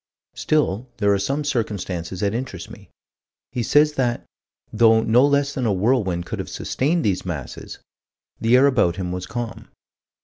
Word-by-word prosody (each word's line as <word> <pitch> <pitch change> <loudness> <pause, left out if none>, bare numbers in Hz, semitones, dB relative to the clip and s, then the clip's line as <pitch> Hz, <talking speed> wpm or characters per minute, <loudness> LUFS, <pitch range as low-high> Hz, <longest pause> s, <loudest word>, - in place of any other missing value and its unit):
Still 130 -6 0
there 100 -2 +3
are 100 - +1
some 135 +9 -1
circumstances 95 - -3
that 100 0 0
interest 115 -7 -5
me. - - -13 0.6
He 125 - -2
says 150 +5 +3
that, 125 -4 -1 0.5
though 110 0 +5
no 120 +3 +4
less 140 0 +2
than 130 -3 -1
a - - +2
whirlwind 95 -4 +1
could - - -5
have - - -5
sustained 160 +5 -1
these 95 -3 0
masses, 75 -9 -6 0.6
the 115 +3 +4
air 135 - +5
about 115 -11 +2
him 90 -1 -4
was 90 0 -5
calm. 120 0 -6
115 Hz, 165 wpm, -22 LUFS, 95-130 Hz, 0.6 s, though